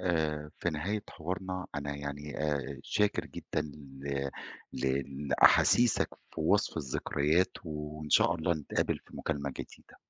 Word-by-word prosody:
آآ 75 -4 0
في 85 - 0
نهاية 95 +8 -1
حوارنا 95 +2 -4
أنا 70 0 -2
يعني 70 +1 -5
آآ 70 -2 -1
شاكر 105 0 +1
جدًا - - -3 0.4
ل 70 -1 -1 0.4
ل 65 +1 +1 0.3
لاحاسيسك 120 - +6 0.3
في - - -4
وصف - - +3
الذكريات 75 +6 +1
وإن 75 -1 -5
شاء 85 - +6
الله 85 +1 +1
نتقابل 75 -3 0
في - - -14
مكالمة 70 -3 -2
جديدة. - - -10
75 Hz, 130 wpm, -32 LUFS, 70-85 Hz, 0.4 s, لاحاسيسك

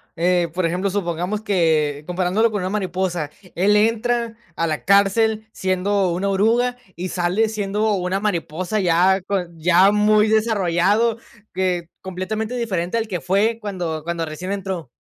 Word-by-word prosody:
eh, 175 0 +1
por 180 +1 -1
ejemplo, 180 +4 0
supongamos 185 +1 -2
que, 160 -8 +1
comparándolo 185 +5 +1
con 205 -3 -2
una 185 - -2
mariposa, 185 -6 -2 0.2
él 200 +4 +3
entra 230 +2 +1 0.2
a 165 - 0
la 155 -2 -2
cárcel 215 +3 +3
siendo 190 0 0
una 185 +3 -1
oruga 230 +5 +2 0.2
y 180 +1 -4
sale 185 +5 +1
siendo 210 0 -1
una 185 0 -1
mariposa 185 0 -2
ya 185 +1 +3
con 180 -4 -4
ya 180 +4 +5
muy 210 +1 +4
desarrollado, 215 +1 +2 0.3
que 180 -2 -1
completamente 215 +5 -4
diferente 200 -4 -2
al 225 -1 -1
que 180 -6 -4
fue 210 +8 +1
cuando 175 -6 -4
cuando 170 0 -2
recién 160 +5 -6
entró. 190 -6 -4
190 Hz, 150 wpm, -21 LUFS, 175-215 Hz, 0.3 s, ya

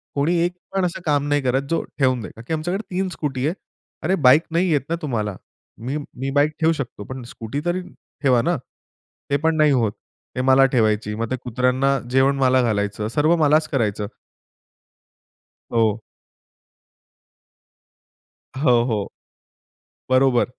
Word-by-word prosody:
कोणी 155 +5 +1
एक 175 - -1 0.2
पण 190 -2 +1
असं 175 +1 -3
काम 145 -1 +1
नाही 145 0 +2
करत, 130 +1 +1
जो 165 - +1 0.2
ठेवून 130 -3 +2
देतं. - - -7
का 115 - -11
की 160 - -2
आमच्याकडे 175 +6 -2
3 190 0 0
स्कूटी 140 -6 -3
आहे. 165 - 0 0.5
अरे 185 +4 +2
बाईक 145 +6 +7
नाही 175 +2 +2
येत 145 - +3
ना 170 - +1
तुम्हाला. 110 -9 -2 0.4
मी 130 +7 -4
मी 135 -2 -6
बाईक 145 +2 +4
ठेऊ 160 0 +3
शकतो, 125 -8 -6
पण 130 +3 -7
स्कूटी 115 +3 -6
तरी 175 +1 0 0.4
ठेवा 125 -3 +4
ना, 170 +2 0 0.7
ते 140 - +4
पण 160 0 +3
नाही 150 -1 +4
होतं. 115 -6 +1 0.4
ते 125 - 0
मला 135 +1 +5
ठेवायची, 110 -2 +1
मग 115 0 -3
ते - - +1
कुत्र्यांना 125 +3 +1
जेवण 135 +2 +3
मला 130 -1 +4
घालायचं, 105 -2 -1
सर्व 155 +8 +2
मलाच 155 +2 +4
करायचं. 105 -6 -1 1.6
हो. 110 -2 +2 2.6
अ, - - -5
हो, 120 -5 +4
हो. 110 -5 -2 1.0
बरोबर. 130 -1 +4
135 Hz, 155 wpm, -22 LUFS, 120-155 Hz, 2.6 s, बाईक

